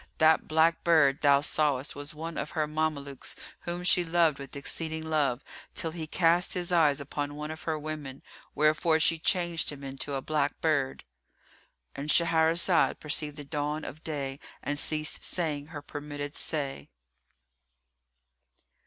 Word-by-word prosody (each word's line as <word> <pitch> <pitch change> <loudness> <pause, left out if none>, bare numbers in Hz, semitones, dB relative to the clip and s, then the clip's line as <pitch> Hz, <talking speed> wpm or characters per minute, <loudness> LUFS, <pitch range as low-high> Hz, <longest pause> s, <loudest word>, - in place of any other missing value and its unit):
That 160 0 +4
black 160 +1 +3
bird 155 -4 +4
thou 140 -1 +5
sawest 145 -3 0
was 145 +1 -5
one 165 +1 -5
of - - -3
her 155 - +2
Mamelukes 150 -3 -3 0.3
whom 175 +1 -2
she 180 0 +4
loved 165 -3 +2
with 140 0 -9
exceeding 160 +3 -3
love, 145 -5 +1 0.3
till 165 - -1
he 160 -1 -6
cast 170 +2 +3
his 180 -1 -2
eyes 155 -5 +4
upon 145 +1 -4
one 150 +1 -5
of 155 0 -8
her 160 -1 0
women, 150 -3 -6 0.3
wherefore 155 +2 +3
she 165 +1 +3
changed 175 -1 +1
him 140 -1 -10
into 135 +1 -3
a 135 - -2
black 150 -2 0
bird";——And 130 - -5
Shahrazad 165 +1 +3
perceived 150 -1 0
the 145 - -6
dawn 150 +1 -3
of 155 - -9
day 140 -3 -4 0.2
and 145 0 -1
ceased 155 0 +1
saying 150 -5 -2
her 150 -3 -8
permitted 145 0 -6
say. 140 - -3
155 Hz, 145 wpm, -29 LUFS, 145-160 Hz, 0.3 s, thou